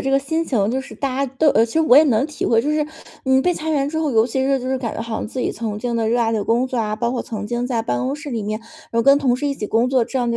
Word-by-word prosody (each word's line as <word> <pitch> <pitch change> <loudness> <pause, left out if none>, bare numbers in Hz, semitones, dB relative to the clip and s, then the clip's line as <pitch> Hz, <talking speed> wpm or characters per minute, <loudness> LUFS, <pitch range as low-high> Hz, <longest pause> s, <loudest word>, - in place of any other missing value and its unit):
这 270 - -1
个 275 - +4
心 320 +4 -1
情， 220 -10 0
就 260 +2 -1
是 265 - -10
大 275 -2 -3
家 - - -9
都 315 - +4
呃， 225 -5 +4
其 225 - -10
实 320 - +3
我 280 -6 +5
也 295 - +9
能 260 -2 +2
体 300 -1 -4
会。 230 0 +3
就 295 - -1
是 300 0 0 0.4
你 265 0 +4
被 360 - +2
裁 320 -2 -5
员 285 -3 +1
之 315 +2 -3
后， 315 -2 0
尤 225 -2 +3
其 260 +2 -1
是 270 0 +2
就 255 - -6
是 260 0 0
感 235 -3 -4
觉 - - -3
好 225 -1 -4
像 - - -4
自 260 - -7
己 - - -1
曾 215 -3 -4
经 240 +1 -3
的 225 -1 0
热 240 +2 +1
爱 230 -1 +1
的 215 -2 0
工 235 +4 +1
作 255 -2 -3
啊， 215 -1 -1
包 235 +1 -1
括 245 - -2
曾 210 -2 -6
经 240 +2 -2
在 240 -3 -1
办 125 - -1
公 270 - -2
室 295 -1 -8
里 230 -4 -2
面 215 +2 -4 0.3
有 230 0 +2
跟 275 +3 +6
同 255 -4 +1
事 290 +3 -3
一 280 - -1
起 215 - -5
工 235 +4 +1
作， 260 -2 +3
这 265 - -3
样 240 -1 0
的 230 - 0
250 Hz, 380 characters per minute, -20 LUFS, 225-275 Hz, 0.4 s, 也